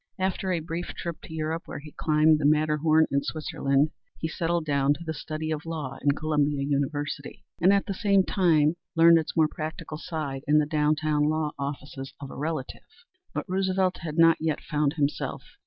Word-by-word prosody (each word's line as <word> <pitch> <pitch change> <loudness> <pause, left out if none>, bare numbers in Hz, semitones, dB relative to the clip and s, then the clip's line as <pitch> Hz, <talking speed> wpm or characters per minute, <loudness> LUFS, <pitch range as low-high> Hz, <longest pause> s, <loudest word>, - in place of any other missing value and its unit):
After 190 0 -1
a 170 -2 0
brief 165 +2 -5
trip 170 -2 -5
to - - -10
Europe, 160 +2 -3
where - - -6
he 150 +1 -10
climbed 155 0 +3
the 145 - -1
Matterhorn 155 +1 +4
in 140 - +2
Switzerland, 145 -1 0 0.3
he 160 - -2
settled 165 0 -1
down 140 -1 +2
to 170 - -9
the 160 - -2
study 155 +1 -4
of 155 0 -2
law 155 -5 -5
in 140 0 +3
Columbia 150 -2 0
University, 140 0 -2 0.2
and 185 +3 +6
at 200 0 +3
the 195 - -3
same 200 -1 +3
time 165 -5 +3 0.2
learned 165 0 +7
its 160 - -5
more 160 -1 +5
practical 155 0 -6
side 155 -6 -4
in 150 +1 +5
the 150 - +4
downtown 150 0 +1
law 155 -1 0
offices 140 -1 -6
of 140 -1 -8
a - - -9
relative. 150 -2 -4 0.5
But - - -3
Roosevelt 190 0 +1
had 160 -2 -6
not 165 0 +6
yet 160 -1 -1
found 150 -2 0
himself. 145 -2 -2
155 Hz, 190 wpm, -27 LUFS, 145-165 Hz, 0.5 s, learned